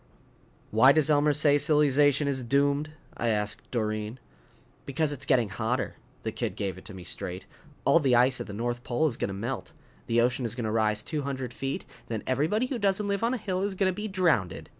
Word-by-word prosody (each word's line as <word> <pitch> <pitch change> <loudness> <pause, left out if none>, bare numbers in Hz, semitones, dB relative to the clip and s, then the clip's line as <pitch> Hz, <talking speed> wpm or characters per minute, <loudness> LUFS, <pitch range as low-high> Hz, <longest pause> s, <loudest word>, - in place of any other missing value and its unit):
"Why 130 +6 +6
does 155 0 +3
Elmer 150 0 +4
say 145 0 +4
silly 150 0 +4
zation 145 +1 +3
is 140 -2 0
doomed?" 140 +4 +1 0.3
I 120 - -2
asked 105 -1 -2
Doreen. 110 0 -2 0.7
"Because 145 +2 0
it's 140 -1 -5
getting 120 -6 +3
hotter." 115 +6 -2 0.3
The 110 - -2
kid 110 -4 -3
gave 100 -3 -3
it - - -18
to 105 - -8
me 90 - -9
straight. 90 +2 -5 0.4
"All 170 - +5
the 135 -5 +3
ice 125 +1 +3
at - - -6
the - - -7
North 120 +3 -3
Pole 130 +6 0
is 140 -7 +1
gonna 100 - -3
melt. 115 +7 -5 0.3
The 115 0 +2
ocean 125 +2 +1
is 115 -1 -3
gonna 115 -3 -2
rise 105 -1 +1
two 155 -2 -3
hundred 135 -3 -4
feet. 135 0 -4 0.2
Then 110 -2 -4
everybody 155 - +1
who 255 -2 -3
doesn't 200 0 +1
live 200 +1 -1
on 235 +2 +2
a - - -2
hill 190 -4 -2
is 200 0 -1
gonna 190 -1 +1
be 210 +3 -4
drownded. 180 - 0
130 Hz, 210 wpm, -28 LUFS, 115-150 Hz, 0.7 s, Why